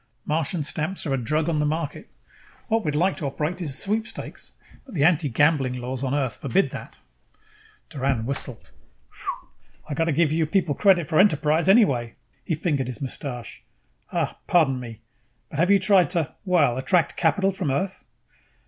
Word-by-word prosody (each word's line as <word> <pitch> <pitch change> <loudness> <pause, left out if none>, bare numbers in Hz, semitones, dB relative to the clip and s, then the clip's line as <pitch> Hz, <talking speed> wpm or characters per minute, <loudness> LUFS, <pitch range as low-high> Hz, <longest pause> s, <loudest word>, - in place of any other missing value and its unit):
Martian 160 +1 -1
stamps 155 +6 -2
are 140 - -1
a - - +1
drug 155 +6 0
on 160 -3 +1
the 150 - +1
market. 155 0 -3 0.6
What 225 0 +1
we'd 150 -1 -1
like 180 +5 +2
to 145 - -3
operate 155 +6 -3
is 165 - -2
a - - -4
sweepstakes, 215 - -4 0.3
but 250 - -12
the 145 - +2
anti 160 -3 +3
gambling 135 0 +2
laws 130 +2 -4
on 135 +1 0
Earth 130 -6 -1
forbid 195 +2 +1
that." - - -8 0.9
Doran 135 -5 -1
whistled. 130 -3 -4 1.2
"I 155 - -4
got 165 +3 +1
to 165 - +1
give 155 0 +2
your 160 -1 +1
people 175 -3 +1
credit 180 -1 +3
for 155 - +2
enterprise, 160 -2 +3
anyway!" 135 - +4 0.3
He 165 - -1
fingered 145 -5 -1
his 125 - -5
mustache. 130 -3 -6 0.5
"Uh, - - -1
pardon 145 -7 +3
me, 115 -2 -9 0.5
but 150 - -5
have 175 +3 +3
you 200 - +7
tried 190 -1 +4
to, 170 -5 -1
well, 150 -9 +3
attract 165 +3 +1
capital 185 +4 +2
from 185 -5 -3
Earth?" 190 +8 -2
155 Hz, 175 wpm, -24 LUFS, 135-180 Hz, 1.2 s, you